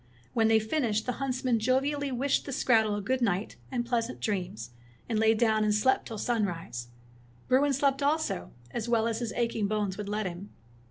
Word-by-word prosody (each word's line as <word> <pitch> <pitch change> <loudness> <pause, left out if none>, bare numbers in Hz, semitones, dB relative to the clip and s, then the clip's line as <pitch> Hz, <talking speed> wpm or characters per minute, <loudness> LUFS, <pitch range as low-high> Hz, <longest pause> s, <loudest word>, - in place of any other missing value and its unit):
When 225 -2 +3
they 225 0 +5
finished, 220 -1 0
the 250 - 0
huntsman 255 -3 0
jovially 275 +4 +1
wished 260 +2 0
the - - -3
skrattel 220 -5 +3
a - - -3
good 255 +5 -1
night 200 -3 0
and 240 -2 -1
pleasant 230 - -1
dreams, 125 - -3 0.4
and 220 -2 0
lay 220 0 +4
down 220 -1 +3
and 210 -1 +2
slept 260 +5 +2
till 225 - -6
sunrise. 175 - -2 0.6
Bruin 280 +3 +4
slept 275 +1 +1
also, 285 - 0 0.2
as 235 0 -3
well 230 -1 +3
as 225 -1 -1
his 235 -2 -3
aching 230 -3 0
bones 205 -2 -1
would 205 -1 -4
let 210 0 -1
him. 180 +2 -6
225 Hz, 185 wpm, -29 LUFS, 210-255 Hz, 0.6 s, they